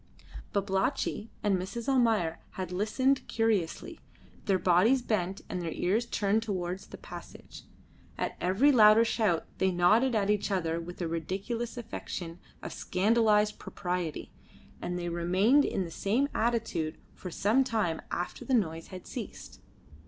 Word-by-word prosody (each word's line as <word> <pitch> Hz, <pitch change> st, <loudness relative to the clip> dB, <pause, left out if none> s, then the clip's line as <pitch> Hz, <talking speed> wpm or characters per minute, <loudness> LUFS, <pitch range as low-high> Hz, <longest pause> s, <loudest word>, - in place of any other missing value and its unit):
Babalatchi 200 Hz, +3 st, -1 dB
and 205 Hz, -2 st, +3 dB
Mrs. 225 Hz, +6 st, -5 dB
Almayer 225 Hz, -11 st, +2 dB
had 185 Hz, -2 st, -5 dB
listened 255 Hz, +8 st, +1 dB
curiously, 220 Hz, -7 st, -1 dB, 0.5 s
their 195 Hz, -2 st, +3 dB
bodies 200 Hz, +9 st, +4 dB
bent 195 Hz, -4 st, -1 dB
and 180 Hz, -, -3 dB
their 165 Hz, -2 st, -3 dB
ears 215 Hz, +7 st, 0 dB
turned 205 Hz, +1 st, +1 dB
towards 185 Hz, -4 st, -3 dB
the -, -, -10 dB
passage. -, -, -11 dB, 0.5 s
At -, -, -2 dB
every 195 Hz, +11 st, +4 dB
louder 220 Hz, -2 st, +7 dB
shout 210 Hz, -8 st, +1 dB
they 190 Hz, -, +3 dB
nodded 215 Hz, +8 st, +3 dB
at 205 Hz, -1 st, +2 dB
each 210 Hz, 0 st, 0 dB
other 165 Hz, -4 st, 0 dB
with 175 Hz, +1 st, -6 dB
a -, -, -1 dB
ridiculous 195 Hz, +9 st, -3 dB
affectation 180 Hz, -7 st, -6 dB, 0.2 s
of -, -, -5 dB
scandalised 210 Hz, +1 st, +2 dB
propriety, 175 Hz, -3 st, -4 dB, 0.5 s
and 180 Hz, 0 st, -3 dB
they 175 Hz, 0 st, -3 dB
remained 185 Hz, +11 st, +3 dB
in 190 Hz, -, -1 dB
the 165 Hz, -, -8 dB
same 235 Hz, -, 0 dB
attitude 225 Hz, -9 st, -1 dB, 0.2 s
for 185 Hz, -, -8 dB
some 215 Hz, +9 st, +2 dB
time 215 Hz, -10 st, -1 dB
after 175 Hz, -, -4 dB
the 265 Hz, -, +1 dB
noise 165 Hz, -7 st, -1 dB
had 185 Hz, -1 st, -9 dB
ceased. -, -, -8 dB
200 Hz, 145 wpm, -30 LUFS, 175-230 Hz, 0.5 s, louder